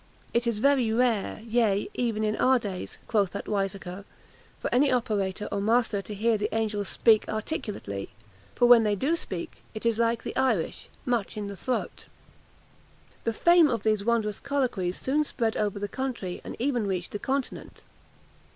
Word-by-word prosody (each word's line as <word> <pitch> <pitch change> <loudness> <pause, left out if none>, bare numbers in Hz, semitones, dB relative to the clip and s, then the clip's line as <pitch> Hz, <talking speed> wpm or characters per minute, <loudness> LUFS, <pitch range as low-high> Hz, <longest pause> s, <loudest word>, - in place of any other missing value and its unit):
It 235 +1 +1
is 230 -3 +1
very 255 -1 +3
rare, 225 -3 +1
yea 220 -3 +1
even 225 -3 -1
in 215 0 +1
our 260 0 +4
days," 200 -6 -5
quoth 205 -5 +2
that 200 - -5
wiseacre, 195 -2 -3 0.6
"for - - -3
any 270 +3 +4
operator 210 -5 0
or 200 - -1
master 225 -1 +2
to 210 +1 -7
hear 220 +1 +2
the 210 +1 0
angels 210 -3 -1
speak 220 -2 +3
articulately: 210 - -4 0.5
when 245 -1 +7
they 210 -2 +1
do 280 - +1
speak, 185 - -6 0.2
it 215 - -6
is 230 -1 +2
like, 230 0 +1
the - - -5
Irish, 225 -11 0 0.2
much 235 -3 -1
in 210 - -3
the 200 - -6
throat!" 250 +5 -3 1.2
The 230 - +1
fame 340 +5 +5
of 230 -5 -1
these 215 -2 +2
wondrous 220 -2 0
colloquies 250 -11 -1
soon 295 +3 +1
spread 230 -6 -1
over 205 -1 -1
the 205 0 -3
country, 235 -7 -4
and - - -7
even 245 -4 0
reached 180 -2 -2
the 205 - -4
Continent. 270 +2 -3
220 Hz, 170 wpm, -27 LUFS, 205-245 Hz, 1.2 s, when